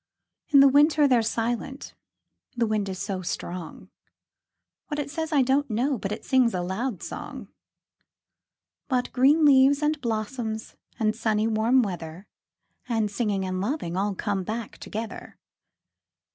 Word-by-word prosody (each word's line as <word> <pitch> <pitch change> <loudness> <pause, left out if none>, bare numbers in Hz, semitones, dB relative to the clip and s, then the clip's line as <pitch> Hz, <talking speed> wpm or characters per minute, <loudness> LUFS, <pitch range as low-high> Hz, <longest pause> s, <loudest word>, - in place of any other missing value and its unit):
In 280 -2 +6
the 275 - +8
winter 290 +2 +5
they're 250 -3 +4
silent 235 +4 -3 0.6
the 235 - +2
wind 215 -2 -1
is 190 - -4
so 195 -1 -3
strong; 175 -1 -6 1.0
What 295 - -4
it 285 -1 -3
says, 320 +2 -3
I 285 -3 +4
don't 270 +2 +1
know, 245 +4 0
but 195 - -4
it 215 - -5
sings 255 -5 +3
a 180 - -1
loud 200 +4 -3
song. - - -7 1.4
But 250 -3 -1
green 285 +5 +4
leaves, 280 +1 +5
and 300 0 0
blossoms, 220 -1 -3 0.2
and 215 -1 +1
sunny 220 -1 0
warm 225 +4 +3
weather, 175 -2 -6 0.6
5 235 -2 -1
And 210 -2 0
singing, 200 -2 -1
and 185 0 -2
loving 205 - -2
all 200 +1 -1
come 200 -1 -2
back 220 +3 -5
together. 225 +2 -7
230 Hz, 145 wpm, -26 LUFS, 205-270 Hz, 1.4 s, the